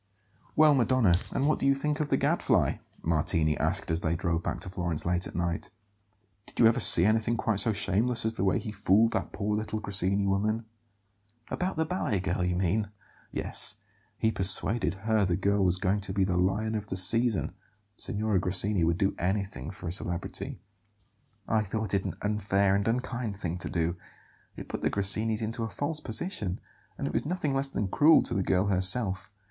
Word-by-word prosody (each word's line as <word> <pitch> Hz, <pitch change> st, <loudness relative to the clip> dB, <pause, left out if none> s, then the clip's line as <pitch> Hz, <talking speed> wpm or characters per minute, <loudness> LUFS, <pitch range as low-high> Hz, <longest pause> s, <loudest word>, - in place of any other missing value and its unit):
"Well, 155 Hz, -1 st, +6 dB
Madonna, 120 Hz, -8 st, +3 dB
and 135 Hz, -, -1 dB
what 155 Hz, -, +1 dB
do -, -, 0 dB
you 140 Hz, -, +4 dB
think 150 Hz, +2 st, -2 dB
of 150 Hz, -1 st, -2 dB
the -, -, +2 dB
Gadfly?" -, -, +1 dB, 0.3 s
Martini 80 Hz, -1 st, +1 dB
asked -, -, 0 dB
as 80 Hz, +1 st, 0 dB
they 80 Hz, +1 st, 0 dB
drove 85 Hz, -1 st, -1 dB
back -, -, -3 dB
to -, -, -5 dB
Florence 85 Hz, -4 st, -3 dB
late 90 Hz, +1 st, 0 dB
at -, -, -11 dB
night. 85 Hz, -1 st, -2 dB, 0.8 s
"Did -, -, -12 dB
you 115 Hz, -, +6 dB
ever 115 Hz, +2 st, +4 dB
see 90 Hz, -6 st, +7 dB
anything 110 Hz, +2 st, +1 dB
quite 110 Hz, -3 st, 0 dB
so 115 Hz, -, +4 dB
shameless 110 Hz, +4 st, 0 dB
as 110 Hz, -, +1 dB
the 95 Hz, -, -3 dB
way 95 Hz, -, +2 dB
he 110 Hz, -, -5 dB
fooled 105 Hz, +2 st, +3 dB
that 95 Hz, -, -3 dB
poor 105 Hz, +1 st, -2 dB
little 110 Hz, 0 st, -3 dB
Grassini 100 Hz, -1 st, -1 dB
woman?" 105 Hz, +4 st, 0 dB, 0.9 s
"About 185 Hz, +1 st, -2 dB
the 160 Hz, -, +1 dB
ballet 155 Hz, -, -1 dB
girl, 90 Hz, +1 st, -2 dB
you 90 Hz, 0 st, 0 dB
mean?" 95 Hz, +4 st, 0 dB, 0.4 s
"Yes, -, -, +4 dB, 0.4 s
he 110 Hz, -, +1 dB
persuaded 95 Hz, 0 st, +3 dB
her 110 Hz, -2 st, +2 dB
the 90 Hz, -3 st, +1 dB
girl 100 Hz, +1 st, +1 dB
was 90 Hz, -1 st, +2 dB
going 95 Hz, +2 st, 0 dB
to 95 Hz, -1 st, -4 dB
be 100 Hz, -1 st, +1 dB
the 95 Hz, -1 st, 0 dB
lion 95 Hz, +5 st, 0 dB
of 105 Hz, -1 st, -4 dB
the 95 Hz, -, -4 dB
season. 115 Hz, +4 st, +1 dB, 0.4 s
Signora 105 Hz, -1 st, -1 dB
Grassini 95 Hz, +1 st, 0 dB
would 85 Hz, 0 st, +1 dB
do 95 Hz, -1 st, +1 dB
anything 95 Hz, -7 st, -2 dB
for 95 Hz, -2 st, -8 dB
a -, -, -2 dB
celebrity." 85 Hz, -1 st, -4 dB, 0.9 s
"I 110 Hz, -, +2 dB
thought 105 Hz, 0 st, -4 dB
it 95 Hz, -1 st, 0 dB
an -, -, -4 dB
unfair 100 Hz, -2 st, +1 dB
and 100 Hz, +1 st, -1 dB
unkind 120 Hz, -3 st, -2 dB
thing 90 Hz, -2 st, -4 dB
to -, -, -6 dB
do; 85 Hz, +1 st, -1 dB, 0.6 s
it -, -, -9 dB
put -, -, -5 dB
the -, -, +1 dB
Grassinis 110 Hz, +3 st, 0 dB
into 115 Hz, +2 st, -3 dB
a 115 Hz, -, -3 dB
false 145 Hz, +7 st, -3 dB
position; 110 Hz, -, -4 dB, 0.4 s
and -, -, -4 dB
it -, -, -3 dB
was -, -, 0 dB
nothing 155 Hz, -3 st, -2 dB
less 135 Hz, +1 st, 0 dB
than 105 Hz, -7 st, -3 dB
cruel 150 Hz, -, +5 dB
to -, -, -3 dB
the 100 Hz, -, 0 dB
girl 95 Hz, +1 st, +1 dB
herself. 95 Hz, +1 st, +1 dB
100 Hz, 195 wpm, -28 LUFS, 90-115 Hz, 0.9 s, see